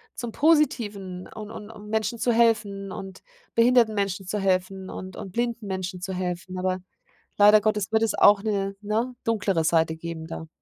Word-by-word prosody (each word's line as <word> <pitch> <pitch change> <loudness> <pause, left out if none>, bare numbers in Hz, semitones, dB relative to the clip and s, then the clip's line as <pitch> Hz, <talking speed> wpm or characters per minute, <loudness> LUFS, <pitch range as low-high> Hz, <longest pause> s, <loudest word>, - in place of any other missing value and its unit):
zum 240 -2 -5
Positiven 210 - +1
und 215 -1 -9
und 210 -1 -9
um 210 -2 -11
Menschen 220 +2 -1
zu 240 - +1
helfen 215 -4 +1
und 190 -1 -8 0.3
behinderten 235 -1 +5
Menschen 200 -1 -2
zu 205 +3 -2
helfen 190 0 -1
und 185 0 -8
und 195 -4 -8
blinden 235 -2 -2
Menschen 185 -1 -4
zu 190 +1 -4
helfen, 185 0 -4
aber 185 0 0 0.6
leider 210 +1 +8
Gottes 210 -2 0
wird 220 0 +3
es 225 - +1
auch 205 0 +5
'ne, 200 -2 -1
ne, 225 +4 -1
dunklere 205 -7 +1
Seite 160 0 +2
geben 160 0 -7
da. 160 0 -7
205 Hz, 175 wpm, -25 LUFS, 185-220 Hz, 0.6 s, leider